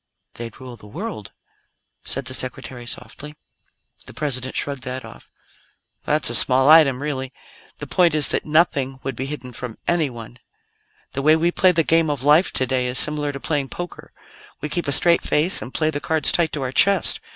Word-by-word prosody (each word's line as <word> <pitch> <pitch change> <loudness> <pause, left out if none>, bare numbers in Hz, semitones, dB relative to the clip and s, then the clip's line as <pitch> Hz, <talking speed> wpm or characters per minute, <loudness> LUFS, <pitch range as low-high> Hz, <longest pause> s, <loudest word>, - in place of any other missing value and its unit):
"They'd 115 -1 -9
rule 125 -2 -10
the 105 - -15
world," 105 0 -7 0.7
said 135 0 -1
the 130 - -5
Secretary 125 -1 -3
softly. 150 +4 -8 0.7
The - - -12
President 130 -4 -2
shrugged 140 -2 -2
that 125 0 -6
off. 110 - -14 0.8
"That's 150 -5 +1
a - - -2
small 130 +3 +5
item, 145 -4 +5
really. 135 -3 -4 0.5
The - - -7
point 175 -4 +2
is 150 -2 +5
that - - -1
nothing 150 -4 +1
would 135 - -4
be 130 +3 -5
hidden 125 -4 -8
from 120 -3 -8
anyone. 125 -8 -3 0.7
"The - - -4
way 155 +3 +4
we 170 +2 +1
play 185 +1 +4
the 165 -2 +1
Game 165 0 +2
of 145 -3 -3
Life 150 +5 +4
today 130 -1 -1
is 125 +1 0
similar 150 0 +4
to 140 - -8
playing 145 -2 -2
poker. 175 0 -8 0.5
We 150 - -5
keep 175 +1 -3
a - - 0
straight 170 +4 +3
face 160 +5 0
and 115 +5 -8
play 155 +2 0
the 145 -1 -5
cards 160 -2 0
tight 170 -2 +1
to 145 - -3
our 130 - -3
chest. 195 +5 +4
140 Hz, 190 wpm, -21 LUFS, 130-155 Hz, 0.8 s, small